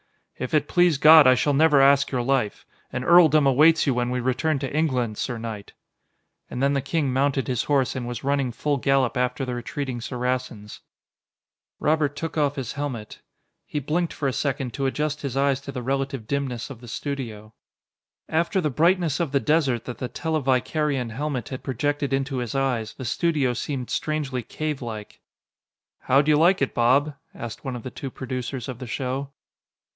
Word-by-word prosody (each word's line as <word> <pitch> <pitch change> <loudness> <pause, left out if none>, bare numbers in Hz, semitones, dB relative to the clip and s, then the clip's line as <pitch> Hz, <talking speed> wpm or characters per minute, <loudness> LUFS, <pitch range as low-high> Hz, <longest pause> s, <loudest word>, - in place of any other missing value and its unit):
"If 130 +4 -2
it 150 -1 +2
please 175 -4 +3
God, 155 -1 +8
I 130 - +7
shall 145 +3 +1
never 150 0 +5
ask 140 +1 +5
your 125 -3 -1
life. 130 -5 0 0.3
An 125 - -3
earldom 155 -2 +6
awaits 155 +5 +5
you 135 - +2
when 120 0 -1
we 125 0 -1
return 130 +5 0
to 135 +1 -4
England, 125 -9 0
sir 125 -3 -2
knight." 110 -3 -7 0.8
And 125 - -3
then 140 +1 +3
the 140 - +1
king 140 -1 -1
mounted 135 0 +1
his 125 -3 -1
horse 135 -4 +1
and 125 -2 -4
was 120 -2 -5
running 140 -2 0
full 145 +4 -1
gallop 135 -1 +1
after 125 +2 -1
the 125 - -4
retreating 125 0 -4
Saracens. 125 -4 -4 1.0
Robert 150 -2 +1
took 165 +2 -5
off 145 -1 +1
his 130 -4 -4
helmet. 130 -7 -5 0.5
He - - -5
blinked 160 +5 -1
for 140 - -2
a 130 - 0
second 135 -3 -2
to 135 -1 -1
adjust 150 +2 -2
his 135 -2 -4
eyes 140 -1 +2
to 140 - -7
the 125 -2 -5
relative 135 -2 -2
dimness 135 -1 -3
of 125 -3 -10
the 120 - -11
studio. 115 -5 -5 0.7
After 170 +4 +1
the 155 -5 0
brightness 165 +1 +2
of 165 -5 -1
the 140 - +4
desert 140 -6 +1
that 125 - -7
the 125 - -3
televicarion 140 -3 0
helmet 135 -1 -3
had 130 - -6
projected 145 +2 -2
into 135 0 -1
his 125 0 -3
eyes, 130 -5 -1
the 130 - -7
studio 145 -1 +1
seemed 125 +1 -4
strangely 145 -5 -2
cavelike. 120 -7 -5 0.8
"How'd 140 +3 +2
you 150 -1 +5
like 175 +5 +4
it, 135 - -2
Bob?" 135 +5 +3 0.2
asked 115 -2 -7
one 130 -2 -4
of 120 - -7
the 130 - -6
two 135 - -6
producers 130 -1 -5
of 125 -2 -6
the 130 - -7
show. 135 +3 -3
135 Hz, 185 wpm, -24 LUFS, 125-145 Hz, 1.0 s, God